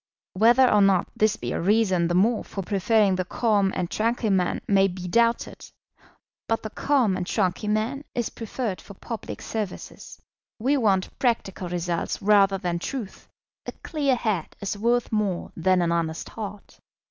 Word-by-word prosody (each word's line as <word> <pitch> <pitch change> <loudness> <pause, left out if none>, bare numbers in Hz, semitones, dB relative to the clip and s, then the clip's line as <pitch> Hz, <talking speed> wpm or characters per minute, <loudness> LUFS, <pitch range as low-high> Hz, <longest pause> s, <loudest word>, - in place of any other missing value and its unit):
Whether 235 +6 +5
or 210 -3 +4
not 195 -3 +3
this 215 0 +2
be - - -5
a - - -2
reason 190 -3 +2
the 175 - -1
more 215 +5 +2
for 195 - -6
preferring 200 0 +2
the 185 - 0
calm 200 0 +1
and 175 - -1
tranquil 225 +2 0
man 180 -2 +1
may 195 -1 +4
be 180 -1 -6
doubted; 235 +5 +1 0.8
but 225 - -1
the 215 - -5
calm 255 -9 +1
and 180 -1 -4
tranquil 200 +1 -1
man 225 +7 -1
is 240 -2 -1
preferred 220 -5 -4
for 200 - -13
public 230 +3 -7
services. 215 -4 -6 0.4
We 260 +6 +1
want 200 -8 0
practical 195 -7 -1
results 175 -1 -2
rather 195 -1 +4
than 175 -3 -2
truth. 225 0 -6 0.4
A - - -4
clear 285 -5 +1
head 215 -9 -2
is 200 0 -3
worth 235 +3 0
more 210 -5 -1
than 180 +1 +2
an 170 - 0
honest 165 -1 -2
heart. 205 -2 -8
205 Hz, 165 wpm, -25 LUFS, 185-230 Hz, 0.8 s, Whether